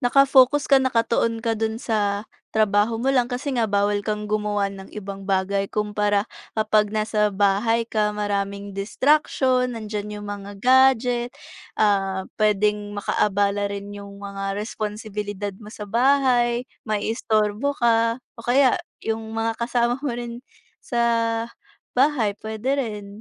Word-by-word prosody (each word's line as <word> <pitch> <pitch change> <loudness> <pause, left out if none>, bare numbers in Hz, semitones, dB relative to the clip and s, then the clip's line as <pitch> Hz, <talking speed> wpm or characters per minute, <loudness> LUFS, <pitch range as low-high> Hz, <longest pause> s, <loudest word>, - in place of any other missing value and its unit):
naka-focus 275 +2 +5
ka, 275 -2 +5
naka-tuon 230 -2 +1
ka 230 - +2
do'n 220 0 -1
sa 210 -3 -1 0.3
trabaho 215 +1 +2
mo 270 +3 +1
lang, 245 -2 +2
kasi 255 +3 -3
nga 230 -3 +1
bawal 205 0 +1
kang 210 0 -2
gumawa 210 -1 0
ng 195 -1 -10
ibang 195 -1 -6
bagay. 195 +1 0
Kumpara 210 -1 0 0.3
kapag 215 -1 +3
nasa 215 0 +1
bahay 205 +4 +2
ka, 215 -2 +1
maraming 200 -1 -2
distraction. 255 +3 +2
Nandiyan 210 -1 -5
'yong 205 - -8
mga 205 0 -6
gadget, 250 0 +4 0.5
ah, 195 -3 +2 0.2
pwedeng 210 0 +2
maka-abala 205 0 +1
rin 200 0 -6
'yong 200 0 -9
mga 195 0 -4
responsibilidad 210 -2 -4
mo 210 - -10
sa 210 - -7
bahay, 245 0 +3 0.2
mai-istorbo 215 +3 0
ka 230 0 +3 0.2
o - - -11
kaya 260 +1 +4 0.3
'yong 225 0 -3
mga 225 0 -1
kasama 240 0 +1
mo 290 - -1
rin 240 0 -6 0.4
sa 240 - -3 1.0
bahay, 250 -6 +2
pwede 220 +5 -1
rin, 215 -7 -3
215 Hz, 130 wpm, -23 LUFS, 205-240 Hz, 1.0 s, naka-focus